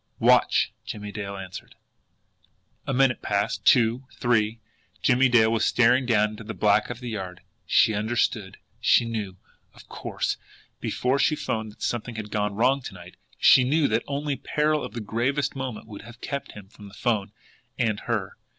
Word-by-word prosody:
"Watch!" - - +4
Jimmie 105 -1 -6
Dale 100 -1 -5
answered. 95 -1 -9 1.1
A - - 0
minute 135 -1 +2
passed 100 0 -1
two 120 +1 +4
three. 115 -2 +1 0.4
Jimmie 130 +1 +4
Dale 110 -2 +5
was 115 -1 +1
staring 125 +1 +3
down 105 -3 +3
into 110 +2 -9
the 110 +1 -7
black 105 -1 +2
of 120 +1 -6
the 125 - -5
yard. 95 -5 -6 0.3
She 110 - +4
understood! 110 +2 -1 0.2
She 120 - +4
knew, 105 -5 -4 0.4
of - - -16
course, - - -3 0.4
before 130 +2 0
she 155 - +3
'phoned 110 -6 -3
that - - -12
something 120 0 -3
had 105 -2 -6
gone 105 -1 -1
wrong 130 +5 +2
to 110 - -8
night. 90 0 -12 0.2
She 130 - +6
knew 145 +3 +2
that 115 +2 +1
only 145 0 -2
peril 150 +2 0
of - - -7
the 120 - -5
gravest 120 +8 -1
moment 130 -5 -5
would 105 -2 -10
have 120 0 -13
kept 140 +1 -5
him 100 -2 -11
from 105 0 -14
the 100 - -14
'phone 110 -5 -1 0.5
and 110 -3 0
her. - - -3
115 Hz, 175 wpm, -25 LUFS, 105-125 Hz, 1.1 s, She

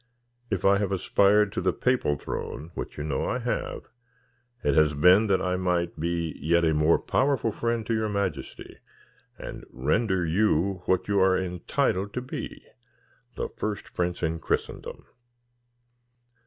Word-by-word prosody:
If 95 -3 -2
I 100 0 +5
have 100 -2 -1
aspired 100 +2 +3
to - - -3
the 95 0 +2
papal 125 - +1
throne 80 +5 -6
which - - -6
you 75 +1 -4
well 70 -3 -1
know - - -1
I - - 0
have - - -3 0.8
it 70 - +2
has 75 0 +4
been 90 +8 +6
that 95 -2 +2
I 90 0 0
might 90 -2 -1
be 85 -1 -2
yet 85 +3 +3
a 80 - +3
more 75 +2 +4
powerful 130 -4 +1
friend 115 0 -2
to 115 - -1
your 110 -1 0
majesty, 100 -7 -4 0.6
and - - -8
render 90 - 0
you 95 +1 +1
what 95 0 +1
you 100 -1 +2
are 95 0 +4
entitled 95 +2 -1
to 125 - -1
be, 130 - -7 0.7
the - - -2
first 105 -1 -5
prince 90 0 -2
in 80 0 0
Christendom." - - -3
95 Hz, 155 wpm, -26 LUFS, 80-100 Hz, 0.8 s, been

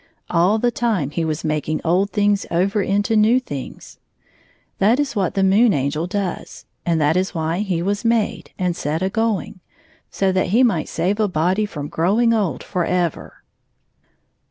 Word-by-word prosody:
All 180 +5 +3
the 240 +2 +1
time 215 - -1
he 165 - -2
was 155 -1 -2
making 155 0 -1
old 185 +4 +2
things 205 -1 +1
over 195 +5 +1
into 205 +3 0
new 220 +4 +4
things. 145 - -8 0.8
That 225 +7 +3
is 280 -3 -1
what 190 -4 -1
the 195 - +2
Moon 200 +3 +4
Angel 145 +4 -1
does, 190 -1 -4 0.2
and 165 -1 +2
that 150 +1 +2
is 185 +1 -1
why 165 +2 -1
he 185 -5 -1
was 200 +3 -1
made, 230 -2 0
and 180 -2 -1
set 160 +2 -2
a 190 - -1
going 225 -4 -1 0.3
— - - -33
so 195 -1 0
that 185 0 0
he 225 +8 +3
might 185 -11 +1
save 185 +6 -1
a 215 - +3
body 185 +4 0
from 145 -7 -6
growing 205 +9 +2
old 200 - -1
forever. 180 -2 -2
190 Hz, 175 wpm, -20 LUFS, 165-210 Hz, 0.8 s, new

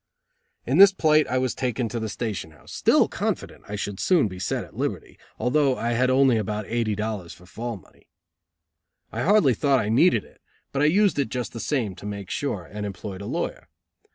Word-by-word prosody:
In 135 +8 +1
this 200 0 +10
plight 155 -5 +3
I 130 - 0
was 130 -1 0
taken 125 -2 -2
to 120 - -3
the 110 -1 -3
station 105 -7 -4
house, 75 - -15
still - - +4
confident - - -4
I 105 - -5
should 100 -1 -4
soon 170 - +3
be 95 -2 -8
set 90 - -2
at - - -15
liberty, - - -4 0.2
although 130 +3 +2
I 115 +1 -1
had 125 +2 +2
only 130 -2 +4
about 105 0 -2
eighty 115 -2 -1
dollars 105 -5 -4
for 90 - -17
fall 115 +4 -5
money. - - -22 1.0
I - - -3
hardly 200 -9 +4
thought 140 +4 +2
I 105 - -1
needed 115 - +4
it, - - -21 0.3
but 140 - -1
I - - +4
used 190 +1 +3
it 140 - 0
just 125 -2 -4
the 115 - -6
same, 115 -7 -1
to 105 - -8
make 100 -2 -6
sure, 105 -11 -2
and 105 +4 -7
employed 100 -1 -6
a 100 - -6
lawyer. - - -3
115 Hz, 210 wpm, -25 LUFS, 105-135 Hz, 1.0 s, this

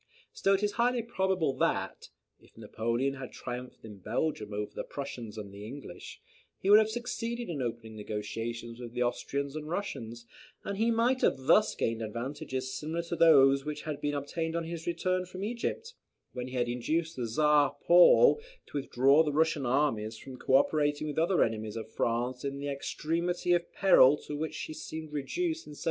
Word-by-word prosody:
Still 195 0 +3
it 195 - -2
is 205 - +2
highly 240 +2 +1
probable 190 - 0
that, - - -1 0.3
if - - -24
Napoleon 115 +5 -1
had 130 -2 -8
triumphed 125 -1 -7
in 105 -3 -10
Belgium 110 - -2
over 105 0 -3
the - - -4
Prussians 120 -6 -7
and 100 -2 -7
the 100 +1 -9
English, 135 +7 -9 0.4
he 195 - +1
would 210 - +10
have 220 0 +2
succeeded 235 0 -4
in 150 -5 -3
opening 115 -2 -5
negotiations 115 +3 -5
with 120 -1 -8
the 125 0 0
Austrians 140 +3 -2
and 155 0 -5
Russians; 120 - -5 0.4
and 200 0 -4
he 230 +1 +3
might 235 +3 +2
have - - +3
thus 175 +11 +3
gained 115 0 -1
advantages 130 +3 -4
similar 160 +3 -3
to 170 - -4
those 140 -5 +6
which 150 0 -5
he 155 - -3 0.2
had 145 - -2
obtained 160 +3 -3
on 170 - -1
his 165 0 -6
return 185 +2 0
from 185 +1 -7
Egypt, 245 - -3 0.4
when 125 0 -5
he 130 0 -5
induced 140 +8 -1
the 125 -2 -3
Czar 145 +3 +3
Paul 180 - +7 0.3
to - - -4
withdraw 135 +2 +4
the 155 -2 +1
Russian 155 -2 +1
armies 115 -5 0
from 130 +2 -10
co 130 - +1
operating 145 +1 +2
with 150 -2 -5
the - - +3
other 175 +2 +3
enemies 110 -1 -3
of 110 -1 -6
France 120 +2 -1
in 140 0 -3
the 140 +1 -4
extremity 170 +5 -1
of 175 -1 0
peril 150 -8 +6
to 150 - -5
which 155 +1 -3
she 155 - -5
seemed 155 0 -7
reduced 325 - -2
in 150 - -9
1799. - - -12
145 Hz, 190 wpm, -30 LUFS, 120-170 Hz, 0.4 s, would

